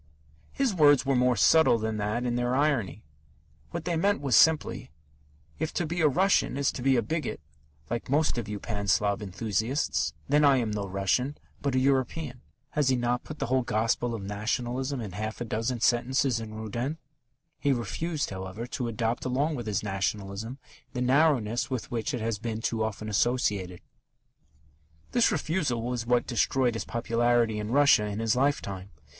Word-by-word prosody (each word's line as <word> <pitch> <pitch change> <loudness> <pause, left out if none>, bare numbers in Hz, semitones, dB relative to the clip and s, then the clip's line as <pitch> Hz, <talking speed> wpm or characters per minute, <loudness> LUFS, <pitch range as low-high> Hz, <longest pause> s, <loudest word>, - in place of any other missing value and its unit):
His 270 -6 0
words 145 -5 +5
were 135 0 +2
more 125 0 +3
subtle 120 +6 +5
than 110 -1 -2
that 105 +4 -1
in 120 - 0
their 120 +1 0
irony. 130 - 0 0.7
What 170 -1 -5
they 175 -1 0
meant 200 +5 +2
was 135 -5 +1
simply: 160 +3 +3 0.7
"If 160 0 -1
to 175 - 0
be 170 +2 -2
a 155 - +5
Russian 185 -1 +2
is 140 -1 +1
to - - -7
be 135 +1 +3
a 120 - +2
bigot, 160 +8 -3 0.5
like 120 +1 -4
most 145 -2 +2
of 110 - -5
you 105 -1 -4
Pan 100 -2 -4
Slav 100 +1 +2
enthusiasts, 110 - -1
then 150 +1 +3
I 140 -2 +6
am 115 -4 -1
no 105 -1 -3
Russian, 100 +9 0 0.2
but 140 -2 -1
a - - +4
European." 130 0 0 0.3
Has 150 -3 +1
he 130 - +3
not 120 0 0
put 155 - -8
the - - -2
whole 130 +2 +2
gospel 115 +1 0
of 105 - -6
Nationalism 120 +6 -2
in 105 -4 -6
half 110 +4 -5
a 120 - -3
dozen 115 +2 -2
sentences 125 +1 +2
in 110 -1 -7
Rudin? 120 +7 -3 0.6
He 145 - +1
refused, 140 - -2
however, 95 +4 -6
to 125 0 -4
adopt 115 +1 -2
along 140 +5 0
with 120 -6 -5
his 105 0 -1
Nationalism 100 +3 -3 0.4
the 125 - -3
narrowness 125 -4 +2
with 130 -5 -4
which 115 -2 -2
it 120 - -4
has 110 -2 -2
been 115 -1 -3
too 110 0 -1
often 110 0 -4
associated. 100 -5 0 1.3
This 240 - +3
refusal 155 -7 -1
was 120 -1 -3
what 120 0 +2
destroyed 125 0 +1
his 115 - -4
popularity 115 -1 +1
in 105 0 -4
Russia, 140 -5 +5
in 105 -1 -4
his 115 0 +1
lifetime. 100 -9 -1
120 Hz, 180 wpm, -28 LUFS, 110-140 Hz, 1.3 s, I